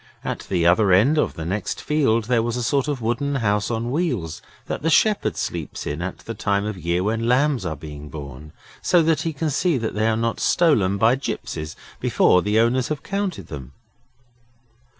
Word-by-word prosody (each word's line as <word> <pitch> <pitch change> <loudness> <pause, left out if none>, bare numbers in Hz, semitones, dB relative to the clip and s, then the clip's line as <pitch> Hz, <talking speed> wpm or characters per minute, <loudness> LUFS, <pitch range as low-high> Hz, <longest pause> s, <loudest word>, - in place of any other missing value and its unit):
At - - -4
the 90 -3 +1
other 95 +4 +4
end 125 +12 +4
of - - 0
the 80 - -5
next 100 +5 -3
field 135 -7 +1
there 120 +1 +2
was 120 +1 -2
a 125 - -2
sort 140 +4 +1
of 140 -5 -3
wooden 130 +5 -1
house 105 -5 0
on 115 +1 -2
wheels, 125 - -2 0.2
that - - -4
the 165 - +1
shepherd 210 +5 +2
sleeps - - -4
in 75 +3 -3
at 95 +2 -4
the 115 - -4
time 100 -2 0
of 105 -1 -3
year 85 +1 -1
when 115 +3 -1
lambs 130 - +2
are 80 - -3
being 75 0 -9
born, 70 +1 -9 0.3
so 175 -2 +4
that 160 -1 +2
he 165 - -1
can 155 0 -2
see 165 +2 +1
that 115 -2 -3
they 110 +1 +1
are 110 - +1
not 115 0 -1
stolen 115 - +3
by 110 +4 +4
gipsies 80 - -5 0.2
before 90 - +3
the 105 +3 0
owners 120 +2 +2
have 150 -2 -4
counted 195 -1 -3
them. 70 -3 -9
115 Hz, 200 wpm, -22 LUFS, 90-140 Hz, 0.3 s, other